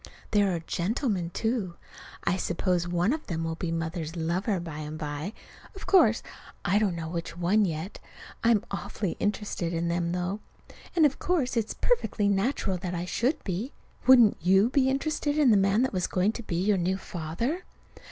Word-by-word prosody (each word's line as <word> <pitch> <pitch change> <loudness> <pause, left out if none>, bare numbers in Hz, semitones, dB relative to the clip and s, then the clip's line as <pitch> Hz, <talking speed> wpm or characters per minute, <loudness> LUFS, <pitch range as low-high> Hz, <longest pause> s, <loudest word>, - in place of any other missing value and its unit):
There 205 -2 +3
are 165 - -3
gentlemen, 185 - -1
too. 215 -2 -2 0.5
I 175 - +2
suppose 180 -1 0
one 175 +7 +1
of 310 - -5
them 165 -2 -2
will 165 0 -2
be 165 +1 -3
Mother's 165 0 -3
lover 180 +5 0
by 165 -3 -6
and 155 0 -5
by; 150 +4 -4 0.4
but 390 - -11
of - - -9
course 340 - +5 0.4
I 195 +3 +3
don't 200 -5 +1
know 165 -1 -4
which 170 0 -5
one 195 +5 +3
yet. 165 +2 -4 0.4
I'm 230 -2 +3
awfully 195 -1 -3
interested 205 -4 -2
in 170 0 -1
them, 170 0 0
though. 180 +3 -2 0.6
And 325 -3 +6
of 280 - +1
course 310 -9 0
it's 225 -2 -1
perfectly 475 - +1
natural 200 -1 +1
that 180 0 -4
I 175 +1 -3
should 255 - 0
be. 200 +8 -3 0.3
Wouldn't 240 -5 +7
you 190 +7 +4
be 265 -1 +3
interested 290 +2 -1
in 285 -5 +5
the - - +6
man 195 +4 +3
that 260 - -1
was 185 -2 0
going 190 +3 +1
to 235 - -7
be 195 -6 -4
your 195 +4 +2
new 185 +2 0
father? 190 - -3
190 Hz, 185 wpm, -28 LUFS, 170-230 Hz, 0.6 s, Wouldn't